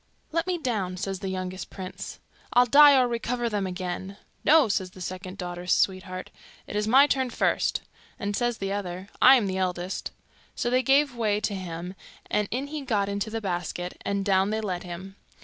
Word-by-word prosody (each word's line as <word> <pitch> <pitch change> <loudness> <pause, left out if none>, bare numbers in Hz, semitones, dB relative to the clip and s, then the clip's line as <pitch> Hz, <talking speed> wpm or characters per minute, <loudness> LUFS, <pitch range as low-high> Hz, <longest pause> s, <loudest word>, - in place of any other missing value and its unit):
'Let 330 +3 0
me 365 -1 0
down,' 210 - -2
says 195 0 -3
the 195 - -4
youngest 185 0 -4
prince. 185 -2 -7 0.3
'I'll 245 0 +6
die 285 +2 +8
or 250 - +3
recover 240 0 -1
them 205 -3 -1
again.' 185 +1 -5 0.3
'No,' 310 -4 +6
says 190 -3 -1
the 185 - -15
second 185 +1 -6
daughter's 175 -1 -4
sweetheart, 185 -1 -1 0.3
'it - - -8
is 210 0 0
my 265 +5 +7
turn 265 -3 0
first.' - - +1 0.4
And 205 0 -2
says 240 0 0
the 195 0 -2
other, 190 -1 -5
'I 265 - +9
am 240 -5 +2
the 190 -1 -2
eldest.' 180 0 -2 0.5
So 240 - -1
they 255 +1 +4
gave 275 0 +3
way 215 -3 +1
to 215 -1 -1
him, 180 -1 -5 0.4
and 210 -1 +1
in 260 +4 -2
he 300 +1 -5
got 210 -7 0
into 200 +2 -2
the 225 +1 -3
basket, 180 -2 -4
and 200 -1 -1
down 190 -1 +3
they 215 +1 -1
let 185 -4 -3
him. 185 +3 -8
200 Hz, 195 wpm, -26 LUFS, 185-240 Hz, 0.5 s, I